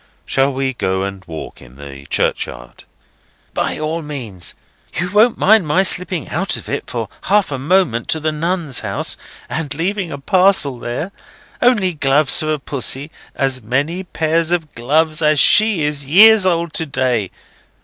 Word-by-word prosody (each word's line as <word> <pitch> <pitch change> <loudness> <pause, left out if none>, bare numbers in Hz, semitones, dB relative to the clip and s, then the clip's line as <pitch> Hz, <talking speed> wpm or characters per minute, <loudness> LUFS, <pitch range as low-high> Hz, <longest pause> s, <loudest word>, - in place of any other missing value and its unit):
"Shall 135 +1 +1
we 135 0 -2
go 95 -5 -1
and 100 -1 -6
walk 80 -2 -8
in - - -16
the 70 -1 -11
churchyard?" - - -3 0.7
"By - - -1
all 155 +2 -3
means. 120 - -5 0.4
You 180 +2 -2
won't 215 +4 +4
mind 210 -4 +4
my 180 +6 +3
slipping 180 -3 +1
out 190 +5 -1
of - - -10
it - - -4
for - - -3 0.2
half 205 -4 +2
a 135 - -3
moment 145 -6 +1
to 160 - +1
the 155 0 -1
Nuns' 165 -3 -1
House, - - -1 0.3
and 155 -2 -4
leaving 180 +2 -2
a 140 - -5
parcel 180 -4 +2
there? 120 +11 -4 0.5
Only 210 -7 +3
gloves 145 -1 +1
for 155 0 0
Pussy; 140 +1 -1 0.2
as 135 -2 -1
many 145 - -1
pairs 165 -2 -1
of 170 -3 -2
gloves 155 +6 0
as 150 -1 +3
she 210 -3 +5
is 145 -1 0
years 200 +7 +6
old 170 -2 0
to 160 - 0
day. 125 -7 0
155 Hz, 160 wpm, -17 LUFS, 130-180 Hz, 0.7 s, years